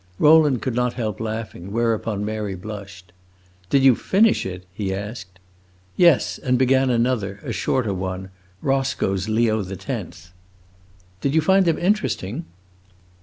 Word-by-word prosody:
Rowland 150 -5 +5
could 130 - -1
not 125 0 0
help 110 -5 -3
laughing; 110 -4 -5
whereupon 110 -2 -1
Mary 105 -2 -3
blushed. 95 -2 -9 0.6
"Did 135 -1 +3
you 135 -1 +7
finish 210 - +2
it?" 90 -1 -7
he 100 -2 -3
asked. 95 -2 -6 0.6
"Yes, 170 -6 +4
and 125 -1 +1
began 130 +1 +3
another 115 -5 0
a - - -4
shorter 115 -6 0
one 95 0 -5 0.3
Roscoe's 135 -8 0
Leo 110 0 +2
the 95 0 -6
Tenth." 90 - -7 0.9
"Did 140 +2 0
you 160 - +5
find 190 +4 +4
them 165 - +2
interesting?" 175 - -1
110 Hz, 135 wpm, -22 LUFS, 95-135 Hz, 0.9 s, you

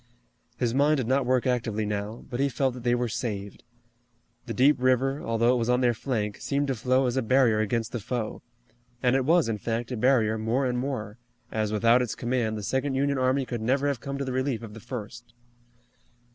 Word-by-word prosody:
His 120 -2 0
mind 145 +3 +3
did 130 - -1
not 130 +1 +1
work 130 -1 +2
actively 115 -4 0
now, 105 +2 -4
but 125 -2 -5
he 140 +1 +2
felt 130 +1 0
that 125 - -8
they 120 0 +2
were 120 0 0
saved. 100 -3 -4 0.8
The 115 - -3
deep 140 +4 +5
river, 130 +2 +2
although 115 +2 +2
it 125 - +1
was 115 +1 -1
on 125 +1 +3
their 120 -1 +3
flank, 110 -4 -2
seemed 140 0 -1
to - - +2
flow 130 +3 +2
as 125 +1 -1
a - - +3
barrier 120 -2 +3
against 110 +2 -1
the 120 - -3
foe, 110 +1 -4 0.6
and 125 +1 +3
it 135 -1 +1
was, 165 0 +4
in 110 -2 -2
fact, 115 +2 -3
a - - -1
barrier 110 -3 +2
more 115 +5 0
and 125 -1 0
more, 120 -5 -4 0.3
as 110 -1 -1
without 115 +3 +4
its 120 -4 -2
command 120 -3 -1
the 105 - -6
second 130 +5 -1
Union 140 0 +1
army 130 +1 +1
could 120 -3 -4
never 135 +5 +1
have 140 -5 -1
come 140 0 -4
to 140 - -3
the 130 - -3
relief 130 -3 -1
of 110 -2 -8
the 115 - -9
first. 120 0 -8
125 Hz, 220 wpm, -27 LUFS, 115-130 Hz, 0.8 s, deep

